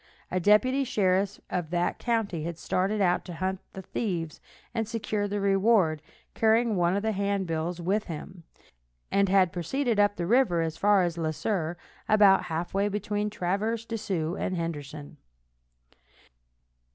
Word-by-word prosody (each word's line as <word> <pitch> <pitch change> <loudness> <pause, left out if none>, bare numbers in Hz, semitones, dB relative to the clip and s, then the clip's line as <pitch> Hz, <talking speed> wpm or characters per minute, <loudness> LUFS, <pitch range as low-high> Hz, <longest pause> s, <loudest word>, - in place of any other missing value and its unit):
A 185 - +1
deputy 235 +9 +4
sheriff 200 -5 +1
of 175 -4 -2
that 175 +1 -1
county 220 -9 -1
had 170 0 -4
started 195 +5 0
out 180 -2 +2
to 175 - -7
hunt 185 +2 -2
the 190 - -8
thieves 170 -7 -3 0.3
and 225 -2 -1
secure 215 -2 -2
the 205 0 -2
reward, 195 -5 +3 0.3
carrying 225 0 +3
one 175 0 +2
of 200 - -1
the 220 - +1
handbills 185 -4 -2
with 195 +5 0
him, 170 +2 -8 0.7
and 200 -1 +3
had 185 -2 +4
proceeded 230 - -1
up 205 0 +3
the 175 - -3
river 200 -6 +3
as 160 -1 -3
far 200 +2 +4
as 170 -1 -2
Le 160 -1 0
Sueur, 170 -1 -2 0.3
about 205 -2 +5
half 165 +1 -4
way 200 +1 +2
between 210 0 -2
Traverse 210 +4 -2
des 230 0 -4
Sioux 175 -5 -2
and 185 - -2
Henderson. 150 -3 -6
195 Hz, 155 wpm, -27 LUFS, 170-210 Hz, 0.7 s, about